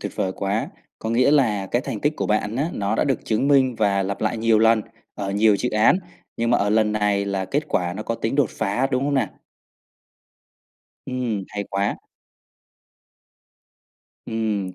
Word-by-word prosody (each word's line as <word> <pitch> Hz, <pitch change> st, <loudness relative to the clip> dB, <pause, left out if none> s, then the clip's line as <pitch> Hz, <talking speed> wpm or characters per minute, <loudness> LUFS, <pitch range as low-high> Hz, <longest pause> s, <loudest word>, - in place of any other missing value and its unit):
tuyệt -, -, -5 dB
vời 95 Hz, -, -1 dB
quá! 100 Hz, +2 st, -1 dB, 0.3 s
Có 110 Hz, -, -4 dB
nghĩa 125 Hz, +4 st, +3 dB
là 110 Hz, -10 st, +2 dB
cái 120 Hz, +6 st, 0 dB
thành -, -, -5 dB
tích 150 Hz, +2 st, +1 dB
của -, -, -2 dB
bạn 105 Hz, +1 st, 0 dB
á, 150 Hz, +5 st, 0 dB
nó 100 Hz, +1 st, -1 dB
đã -, -, +2 dB
được 135 Hz, -5 st, -1 dB
chứng 115 Hz, +5 st, 0 dB
minh 130 Hz, -3 st, +4 dB
và 100 Hz, -2 st, +2 dB
lặp 100 Hz, +1 st, -4 dB
lại 110 Hz, +1 st, 0 dB
nhiều 110 Hz, -1 st, +3 dB
lần, 110 Hz, 0 st, +4 dB, 0.3 s
ở 100 Hz, -1 st, -4 dB
nhiều 105 Hz, +1 st, +4 dB
dự 125 Hz, +4 st, -2 dB
án, 110 Hz, +9 st, +4 dB, 0.4 s
nhưng 115 Hz, 0 st, 0 dB
mà 120 Hz, -, +4 dB
ở 105 Hz, -, +1 dB
lần 110 Hz, 0 st, +3 dB
này 105 Hz, -2 st, +1 dB
là 100 Hz, -1 st, -2 dB
kết 145 Hz, +10 st, -2 dB
quả 90 Hz, -1 st, 0 dB
nó 105 Hz, -, -5 dB
có 115 Hz, -, -2 dB
tính 115 Hz, +1 st, -2 dB
đột 140 Hz, -5 st, +2 dB
phá, 110 Hz, +6 st, 0 dB
đúng 130 Hz, 0 st, 0 dB
không 145 Hz, 0 st, 0 dB
nè? 135 Hz, -, +1 dB, 1.8 s
Ừm, 125 Hz, -6 st, -2 dB
hay 100 Hz, -1 st, -4 dB
quá! 100 Hz, +1 st, -1 dB, 2.3 s
Ừm, 105 Hz, -4 st, -2 dB
110 Hz, 185 wpm, -23 LUFS, 100-125 Hz, 2.3 s, minh